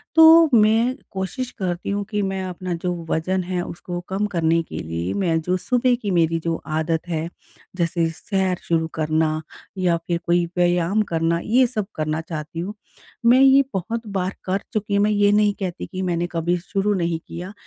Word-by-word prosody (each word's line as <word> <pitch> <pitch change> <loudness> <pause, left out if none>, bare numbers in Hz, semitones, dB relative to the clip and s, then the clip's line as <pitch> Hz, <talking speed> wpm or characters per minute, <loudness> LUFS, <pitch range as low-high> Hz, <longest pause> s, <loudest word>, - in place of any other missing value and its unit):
तो 325 0 +8
मैं 225 +3 +4 0.2
कोशिश 190 +7 -3
करती 180 -2 -3
हूँ 200 0 -1
कि 210 -1 -1
मैं 190 -1 -2
अपना 185 -1 -4
जो 180 0 0 0.2
वजन 185 +3 0
है 180 0 -2
उसको 175 +1 -6
कम 195 +2 0
करने 165 -3 +1
के - - -8
लिए 85 +3 -3
मैं 165 -4 +1
जो 180 +3 0
सुबह 250 +4 +2
की 205 -3 -2
मेरी 165 -1 +2
जो 165 -1 0
आदत 160 +2 -1
है, 165 0 -2 0.5
जैसे 170 -1 0
सैर 190 +2 -1
शुरू 160 -1 0
करना 155 0 0 0.4
या 180 -2 +2
फिर 170 -1 +1
कोई 175 0 +2
व्यायाम 175 +3 +2
करना 165 +1 +1
ये 250 +4 +4
सब 215 -5 -3
करना 155 +1 -1
चाहती 160 0 -6
हूँ। 195 +5 -4 0.5
मैं 245 +2 +6
ये 270 +1 +7
बहुत 225 +5 -3
बार 185 +1 -2
कर 190 +1 0
चुकी 210 -1 -1
हूँ 200 - +3
मैं 215 - +2
ये 205 0 +3
नहीं 210 0 +3
कहती 185 -2 -4
कि 185 0 -6
मैंने 175 -1 -1
कभी 170 +1 0
शुरू 195 +3 -1
नहीं 170 -3 -1
किया 180 +4 -7
180 Hz, 185 wpm, -22 LUFS, 165-205 Hz, 0.5 s, तो